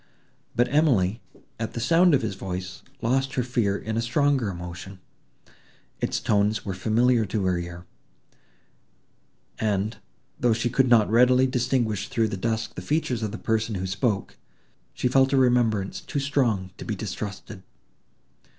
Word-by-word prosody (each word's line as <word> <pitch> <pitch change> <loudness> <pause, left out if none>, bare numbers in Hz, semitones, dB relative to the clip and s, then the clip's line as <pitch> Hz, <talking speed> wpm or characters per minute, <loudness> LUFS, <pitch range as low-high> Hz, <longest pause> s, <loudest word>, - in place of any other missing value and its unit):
But 120 - +3
Emily, 115 - +2 0.4
at 110 - -4
the - - -2
sound 165 +7 +4
of 130 - 0
his 110 -3 -2
voice, 95 -1 -6 0.2
lost 135 +3 0
her 125 - +1
fear 115 -5 0
in 110 +1 -4
a - - +1
stronger 130 -1 +1
emotion: 90 +1 -8 1.0
its - - -1
tones 105 +1 +1
were 95 - -3
familiar 115 +5 +2
to 100 -1 -1
her 90 -1 +1
ear, 85 +1 -7 1.7
and, 105 -1 -1 0.4
though 120 -2 +3
she 115 +2 -1
could 130 +1 +3
not 110 -3 +5
readily 125 +2 +5
distinguish 120 -5 0
through 115 -2 +1
the 100 - -3
dusk 110 +3 -2
the - - -7
features 150 -6 -1
of 110 -2 -2
the 110 - -5
person 110 -1 -1
who 95 0 -3
spoke, 100 +2 -1 0.6
she - - 0
felt 135 +2 +3
a - - +4
remembrance 120 -6 +2
too 145 - -3
strong 120 -9 0
to - - -6
be 110 - -3
distrusted. 100 -1 -6
110 Hz, 155 wpm, -25 LUFS, 100-125 Hz, 1.7 s, not